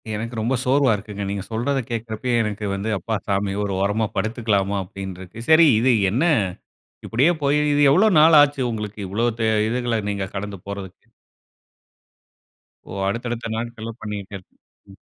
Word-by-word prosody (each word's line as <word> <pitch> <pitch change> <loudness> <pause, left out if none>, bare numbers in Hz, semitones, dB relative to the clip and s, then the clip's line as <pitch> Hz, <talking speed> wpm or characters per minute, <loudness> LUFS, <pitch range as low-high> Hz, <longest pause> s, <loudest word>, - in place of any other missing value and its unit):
எனக்கு 115 +3 -5
ரொம்ப 120 +4 0
சோர்வா 135 -1 +3
இருக்குங்க. 105 0 -6
நீங்க 100 -1 -3
சொல்றத 125 +5 0
கேட்கிறப்பயே 115 +1 -2
எனக்கு 105 0 -4
வந்து, 100 +3 -3
"அப்பா 110 +3 -3
சாமி 100 -1 0
ஒரு 100 -1 -2
ஓரமா 105 +3 +1
படுத்துக்கலாமா" 110 -3 0
அப்படின்னு 95 0 -8
இருக்கு. 95 +4 -11
சரி 160 +1 +7
இது 125 +2 +3 0.2
என்ன, 125 +9 +1 0.8
இப்படியே 135 +10 +3
போய், 145 +1 +2 0.2
இது 145 - +2
எவ்வளோ 190 +9 +5
நாள் 155 0 +7
ஆச்சு? 145 -1 +2
உங்களுக்கு 105 -1 -5
இவ்வளோ 110 +6 0
த 115 - 0 0.3
இதுகள 120 -1 -1
நீங்க 100 -1 -2
கடந்து 100 0 -5
போறதுக்கு? 100 -2 -8 1.8
ஓ, - - -8 0.2
அடுத்தடுத்த 115 +2 -3
நாட்கள்ல 115 0 -5
பண்ணிக்கிட்டே 105 -2 -6
இருக் 95 - -18 0.4
ம். 95 - -15
110 Hz, 150 wpm, -22 LUFS, 100-125 Hz, 1.8 s, சரி